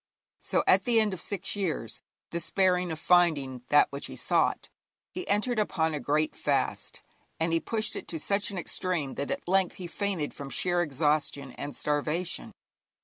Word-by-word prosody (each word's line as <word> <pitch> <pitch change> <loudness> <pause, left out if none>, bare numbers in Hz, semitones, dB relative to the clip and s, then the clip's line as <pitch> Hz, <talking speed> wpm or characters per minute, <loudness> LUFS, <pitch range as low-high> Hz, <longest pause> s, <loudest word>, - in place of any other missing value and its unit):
So, - - 0
at - - +5
the 235 -2 +4
end 215 -3 +2
of 185 - -5
six 200 0 -1
years, 165 - -2 0.3
despairing 180 +1 +1
of 160 - -4
finding 155 -8 +3
that 145 - +5
which 140 +1 -4
he - - -8
sought, - - +1 0.4
he 365 - -6
entered 215 +3 +1
upon 160 -6 +1
a 150 - -2
great 150 +4 0
fast, - - -1 0.4
and 165 +1 +1
he 165 - +4
pushed 220 +4 -2
it - - -6
to 165 - -4
such 200 +5 0
an 200 - -5
extreme 175 -5 -2
that 140 - -3
at - - -3
length 190 0 +2
he 185 - -7
fainted 175 -3 -2
from 140 -1 -7
sheer 175 +4 +1
exhaustion 145 -2 0
and 145 +3 -6
starvation. 150 +4 -1
170 Hz, 175 wpm, -29 LUFS, 145-190 Hz, 0.4 s, at